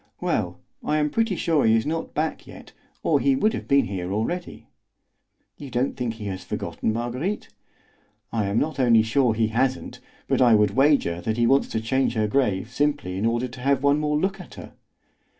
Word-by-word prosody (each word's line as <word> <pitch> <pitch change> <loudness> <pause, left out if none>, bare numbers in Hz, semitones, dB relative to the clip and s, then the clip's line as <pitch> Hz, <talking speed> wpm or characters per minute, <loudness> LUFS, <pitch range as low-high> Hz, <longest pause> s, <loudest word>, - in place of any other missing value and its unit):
"Well, - - -2 0.2
I 150 - 0
am 150 -1 0
pretty 225 -4 0
sure 160 -3 +1
he 110 0 +4
is 110 - +1
not 160 +2 -3
back 155 +1 -2
yet, - - -12 0.3
or - - +3
he 275 - +2
would 220 -4 +1
have - - -5
been 140 0 +4
here 95 -2 -4
already." 170 - -3 0.9
"You 140 - -9
don't 125 +2 -1
think 120 -2 -3
he 110 -2 -8
has 95 -2 -5
forgotten - - -3
Marguerite?" 120 - -3 0.8
"I 110 -3 -1
am 100 +2 -1
not 150 0 -1
only 115 -4 +5
sure 115 0 +2
he 110 0 +1
hasn't, 130 +3 -1 0.3
but - - +1
I 120 -3 +6
would 105 -2 +3
wager 135 - +2
that 110 +6 -2
he 120 - +3
wants 135 +3 +3
to 110 - -2
change 130 +2 0
her 110 -1 +1
grave 105 -3 0
simply 145 -8 -1
in 100 +4 0
order 120 +2 0
to 125 +1 -11
have 135 0 +1
one 140 +1 +3
more 150 0 0
look 190 +4 -1
at - - -13
her." - - -10
125 Hz, 205 wpm, -24 LUFS, 110-150 Hz, 0.9 s, I